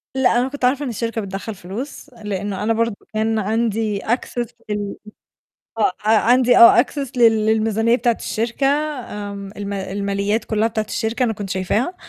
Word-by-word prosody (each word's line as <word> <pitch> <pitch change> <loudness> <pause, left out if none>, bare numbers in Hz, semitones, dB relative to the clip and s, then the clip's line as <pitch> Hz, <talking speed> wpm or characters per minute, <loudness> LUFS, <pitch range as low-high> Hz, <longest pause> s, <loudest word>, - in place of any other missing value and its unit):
لأ، 250 -2 +3
أنا 250 - +1
كنت 280 -2 -2
عارفة 270 +3 +2
إن - - -3
الشركة 230 0 -3
بتدخّل 195 +2 -6
فلوس، 220 +11 -7
لإنه 205 -1 -3
أنا 225 +2 +2
برضه 230 -1 0 0.2
كان 220 +1 0
عندي 220 0 0
access 240 +1 -2 0.2
لل 205 -1 -3 0.8
آه، 210 - +3
عندي 245 +3 +4
آه 235 +1 +9
access 275 -1 -5
لل 225 -3 +4
للميزانية 220 +1 +2
بتاعة 240 -3 +1
الشركة، 235 +5 -1
آمم 230 -9 -3
الما 200 -2 -4
الماليات 200 +2 -1
كلّها 220 0 +1
بتاعة 220 -1 -2
الشركة، 225 +3 -2
أنا 230 - +1
كنت 200 -2 -6
شايفاها، 200 - -1
225 Hz, 160 wpm, -20 LUFS, 205-240 Hz, 0.8 s, آه